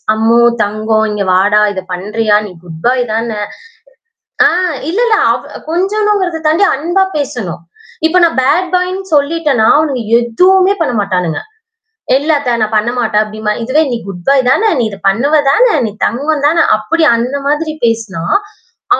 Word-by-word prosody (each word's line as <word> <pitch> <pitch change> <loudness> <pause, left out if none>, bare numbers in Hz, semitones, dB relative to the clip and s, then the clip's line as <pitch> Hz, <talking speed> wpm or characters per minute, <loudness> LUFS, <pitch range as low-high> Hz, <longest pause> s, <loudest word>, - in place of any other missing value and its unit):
அம்மு, 230 +2 +2 0.2
தங்கம், 215 +1 0
இங்க 205 -1 -2
வாடா! 205 +3 +3
இத 190 - -4
பண்றியா? 210 +4 -1
நீ - - -11
குட் 165 -2 -11
பாய் 250 0 +2
தானே 225 -1 -2 1.1
ஆ - - +7 0.4
இல்ல, 390 +7 -2
இல்ல 440 -2 +2
அவ - - -4
கொஞ்சணுங்கிறத 385 -1 0
தாண்டி, 325 +6 +2
அன்பா 345 +7 0
பேசணும். 245 - -4 0.5
இப்ப 355 +3 +1
நான் 335 -4 +2
பேட் 345 +7 +1
பாய்னு 365 +1 -1
சொல்லிட்டேன்னா, 290 -5 +1
அவனுங்க 285 -5 -1 0.2
எதுவுமே 370 - +3
பண்ண 295 - 0
மாட்டானுங்க. 180 -5 -1 0.8
இல்ல 300 +3 -1
அத்தை, 250 -4 -2
நான் 215 0 -1
பண்ணமாட்டேன் 220 -1 0
அப்டிம்பான், 215 0 -4
இதுவே 290 +7 +1
"நீ 240 - -1
குட் 175 -3 -8
பாய் 265 -2 +3
தானே! 440 +9 +2
நீ 235 - +1
இதை 200 -2 -10
பண்ணுவா 280 +10 +1
தானே! 470 +1 +3
நீ 215 - -3
தங்கம் 290 +3 -1
தானே!" 335 +2 +2
அப்படி 330 0 -1
அந்த 250 +4 -2
மாதிரி 310 +2 -1
பேசினா, 220 -7 -2 0.7
அ - - -3
250 Hz, 155 wpm, -13 LUFS, 215-325 Hz, 1.1 s, ஆ